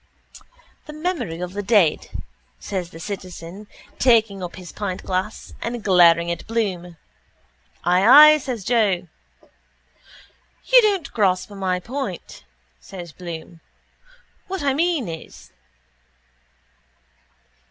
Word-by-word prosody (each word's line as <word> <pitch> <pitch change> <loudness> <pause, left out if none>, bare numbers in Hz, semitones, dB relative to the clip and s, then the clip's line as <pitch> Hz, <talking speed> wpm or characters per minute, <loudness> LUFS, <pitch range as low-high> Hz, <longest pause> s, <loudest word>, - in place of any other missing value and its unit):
—The 300 - -8
memory 305 - -3
of 180 0 -5
the 205 - -3
dead, 200 -6 +2 0.5
says 185 -4 -4
the 165 - -12
citizen 185 +1 -8 0.3
taking 225 -6 +3
up 175 -1 -6
his 180 -3 -10
pintglass 190 0 -4
and 235 -1 -4
glaring 170 -3 +5
at 170 - -6
Bloom. 185 -7 -3 0.9
—Ay, 235 +13 +8
ay, - - +2
says 250 -6 -5
Joe. 200 -5 +1 1.6
—You - - +6
don't 395 -9 0
grasp 190 -3 +1
my 190 -2 -2
point, 265 +8 -6 0.3
says 175 -4 -10
Bloom. 170 -1 -9 0.9
What 380 -4 -4
I 275 -1 +2
mean 320 - 0
is... 70 - -10
195 Hz, 105 wpm, -22 LUFS, 175-240 Hz, 1.6 s, Ay